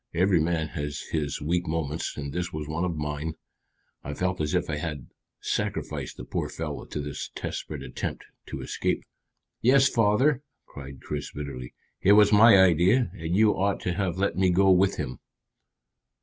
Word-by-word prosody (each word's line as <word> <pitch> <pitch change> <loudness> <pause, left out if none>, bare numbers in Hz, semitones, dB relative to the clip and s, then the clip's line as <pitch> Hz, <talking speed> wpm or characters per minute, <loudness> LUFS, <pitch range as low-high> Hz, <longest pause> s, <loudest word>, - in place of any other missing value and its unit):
Every 90 +1 +3
man 80 -1 0
has 75 -1 -4
his 75 -3 -1
weak 85 +3 0
moments, 80 -1 -3
and 70 -1 -5
this 90 0 -2
was 75 -2 -5
one 80 +3 -2
of 85 -2 -2
mine. 75 +1 -3 0.7
I 75 +1 -5
felt 90 0 -1
as 75 -1 0
if - - 0
I 75 - -2
had 75 -5 -4 0.4
sacrificed - - -3
the - - -7
poor - - -3
fellow - - -5
to - - -5
this 75 0 -5
desperate - - -5
attempt - - -5 0.2
to - - -6
escape." - - -2 0.6
"Yes, 130 +3 +5
father," 125 +5 +3 0.2
cried 70 -2 -10
Chris 75 -1 -4
bitterly. 65 -4 -7 0.3
"It 100 - +6
was 105 0 +6
my 105 0 +8
idea, 95 +5 +4
and 85 -2 -3
you 105 +1 +5
ought 100 +1 0
to 90 - -1
have 90 -2 -1
let 100 +1 0
me 95 0 +3
go 95 +2 +4
with 95 +2 +4
him." 65 - -4
85 Hz, 175 wpm, -26 LUFS, 75-95 Hz, 0.7 s, my